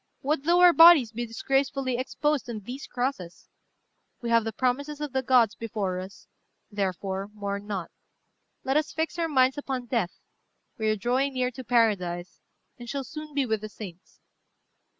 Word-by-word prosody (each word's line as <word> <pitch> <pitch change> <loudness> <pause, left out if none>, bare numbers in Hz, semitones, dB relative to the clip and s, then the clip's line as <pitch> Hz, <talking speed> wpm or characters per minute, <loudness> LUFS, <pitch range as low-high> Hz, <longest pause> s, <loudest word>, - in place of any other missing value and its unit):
What 290 0 -1
though 350 +2 +4
our 355 -1 +8
bodies 330 -9 +8
be 240 +1 -4
disgracefully 270 +2 0
exposed 285 +1 -1
on 220 -3 -5
these 250 +7 -8
crosses? 245 -9 -4 0.7
we 235 -2 -4
have 230 -1 +4
the 225 - -2
promises 280 +6 -1
of 295 -3 -5
the 265 - +1
gods 245 -4 +4
before 205 -5 -3
us; 190 +2 -10 0.4
therefore, 195 -1 -2
mourn 200 0 -4
not. 195 -5 -4 0.7
Let 270 +2 +1
us 310 0 0
fix 320 +2 -2
our 330 -1 0
minds 260 -1 +3
upon 265 -3 -4
death: 230 -7 -1 0.6
we 220 0 +1
are 215 - +2
drawing 255 +6 0
near 255 0 0
to 260 +1 -9
paradise, 195 -8 0 0.4
and 240 -1 -9
shall 280 +1 -3
soon 305 +1 -9
be 280 -2 +2
with 220 -3 -1
the 215 - -6
saints. 190 -5 -11
245 Hz, 170 wpm, -27 LUFS, 210-275 Hz, 0.7 s, our